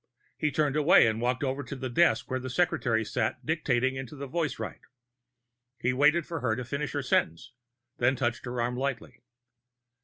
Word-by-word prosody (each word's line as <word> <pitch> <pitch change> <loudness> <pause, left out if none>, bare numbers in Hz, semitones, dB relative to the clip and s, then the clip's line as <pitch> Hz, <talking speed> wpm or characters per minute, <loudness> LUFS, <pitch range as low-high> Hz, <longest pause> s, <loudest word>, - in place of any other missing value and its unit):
He 150 - 0
turned 145 0 +1
away 150 -2 +6
and 110 0 0
walked 125 +3 0
over 135 +1 -1
to 140 0 -7
the 130 -1 -4
desk 170 +8 +2
where 130 - 0
the 130 0 -6
secretary 125 -7 +1
sat 105 - -2
dictating 130 -5 +1
into 130 +1 -7
a - - -5
voicewrite. 155 0 -3 1.0
He 125 - +1
waited 150 +5 +3
for 165 -2 -4
her 110 - 0
to 125 - -5
finish 140 +4 -3
her 145 -1 -2
sentence, 85 -2 0 0.5
then 130 +3 +3
touched 120 -2 -2
her 120 0 -4
arm 120 +1 0
lightly. 125 -3 -4
130 Hz, 180 wpm, -28 LUFS, 120-145 Hz, 1.0 s, away